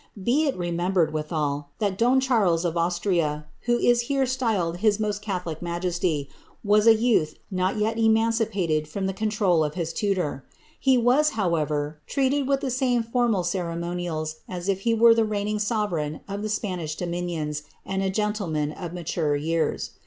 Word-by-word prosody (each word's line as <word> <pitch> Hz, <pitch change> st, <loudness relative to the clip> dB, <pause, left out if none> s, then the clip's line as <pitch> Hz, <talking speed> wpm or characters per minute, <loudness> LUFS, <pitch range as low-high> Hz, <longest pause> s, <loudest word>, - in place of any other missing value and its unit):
Be 255 Hz, +11 st, +2 dB
it 275 Hz, -, -1 dB
l^ 175 Hz, -1 st, -2 dB
niembered, 175 Hz, -1 st, +1 dB
withal, 150 Hz, -2 st, -2 dB
that 200 Hz, -3 st, 0 dB
don 245 Hz, +5 st, +3 dB
Charles 205 Hz, -10 st, +2 dB
of 170 Hz, -1 st, -1 dB
Austria, 170 Hz, -3 st, 0 dB, 0.2 s
who 240 Hz, 0 st, +3 dB
is 240 Hz, 0 st, +3 dB
here 275 Hz, -1 st, +2 dB
styled 225 Hz, -10 st, 0 dB
Iw 215 Hz, 0 st, +2 dB
most 210 Hz, -1 st, -1 dB
catholic 180 Hz, -6 st, -4 dB
majesty, 170 Hz, -4 st, -1 dB, 0.4 s
was 210 Hz, +1 st, +4 dB
a 225 Hz, -, +8 dB
youth 215 Hz, -10 st, +2 dB, 0.2 s
not 185 Hz, +2 st, 0 dB
yet 220 Hz, +2 st, 0 dB
emancipated 220 Hz, -8 st, +2 dB
from 190 Hz, +5 st, -3 dB
the 190 Hz, -, -1 dB
cos* 215 Hz, +3 st, -1 dB
trol 190 Hz, -6 st, +2 dB
of 150 Hz, 0 st, -3 dB
his 165 Hz, -2 st, -3 dB
tutor. 180 Hz, -10 st, -1 dB, 0.4 s
He 265 Hz, -2 st, +4 dB
was, 250 Hz, +6 st, +4 dB
however, 150 Hz, -5 st, -1 dB
treated 275 Hz, 0 st, +1 dB
with 275 Hz, -1 st, +1 dB
the 265 Hz, -, -2 dB
same 250 Hz, -2 st, +1 dB
fonnal 230 Hz, -4 st, +1 dB
co^ 175 Hz, -1 st, -2 dB
monials 170 Hz, -2 st, -3 dB
as 180 Hz, 0 st, -5 dB
if 195 Hz, -1 st, +1 dB
he 230 Hz, +3 st, +1 dB
were 230 Hz, +1 st, +7 dB
tlie 225 Hz, -1 st, +1 dB
reigning 210 Hz, 0 st, -1 dB
sovereign 205 Hz, -9 st, -1 dB
of 200 Hz, +1 st, -4 dB
the 215 Hz, -, -3 dB
Spanish 180 Hz, -7 st, -3 dB
doroiniooi 170 Hz, -4 st, -3 dB, 0.2 s
and 195 Hz, 0 st, -2 dB
a 195 Hz, -, 0 dB
gentleman 190 Hz, -7 st, -1 dB
of 170 Hz, +1 st, -7 dB
mature 165 Hz, -3 st, -1 dB
years. 160 Hz, +3 st, -1 dB
190 Hz, 175 wpm, -25 LUFS, 165-225 Hz, 0.4 s, a